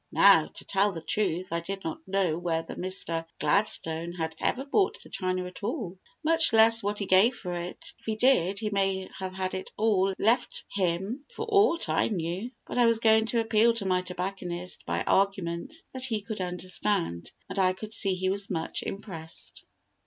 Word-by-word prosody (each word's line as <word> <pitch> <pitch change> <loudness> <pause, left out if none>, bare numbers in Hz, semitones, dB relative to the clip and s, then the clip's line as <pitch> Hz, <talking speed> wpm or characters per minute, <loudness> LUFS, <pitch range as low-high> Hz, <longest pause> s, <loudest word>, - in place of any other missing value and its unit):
Now, - - +6
to - - -8
tell 200 +1 +2
the 165 -3 -7
truth, 185 -3 -1
I 170 - +1
did 195 +3 -6
not 160 - -4
know 190 -4 +1
whether 165 -1 -2
Mr. 175 -3 -2 0.2
Gladstone 170 -5 +1
had 160 -2 -4
ever 265 +2 -1
bought 385 +7 +1
the - - -14
china 185 -1 -2
at 180 - -9
all, 200 - -4 0.2
much 325 -3 +5
less 225 +1 +6
what 205 +1 -2
he 200 - -1
gave 195 +7 +4
for 180 -6 -5
it, 175 +1 -6
if - - -24
he 220 - 0
did; 215 -6 +3
he 215 0 -2
may 195 -1 0
have 190 -1 -5
had 185 -1 -2
it 185 - -5
all 195 -3 +2
left 235 +4 +1
him 195 +8 -1
for - - -3
aught 400 -5 +4
I - - +2
knew. 185 +3 -3 0.2
But - - -3
I 240 - +6
was 230 -1 +4
going 220 0 +4
to 230 0 +1
appeal 225 +1 +3
to 215 -4 -4
my 185 -1 +2
tobacconist 180 -1 -5
by - - -1
arguments 195 - 0
that 260 -1 -1
he 225 -4 -1
could 205 0 -5
understand, 180 - -1 0.2
and 185 +1 -4
I 185 -1 +3
could 215 +3 -8
see 195 -3 +3
he 185 +1 0
was 200 0 -3
much 165 -4 -2
impressed. 175 -6 -7
195 Hz, 190 wpm, -28 LUFS, 180-220 Hz, 0.2 s, Now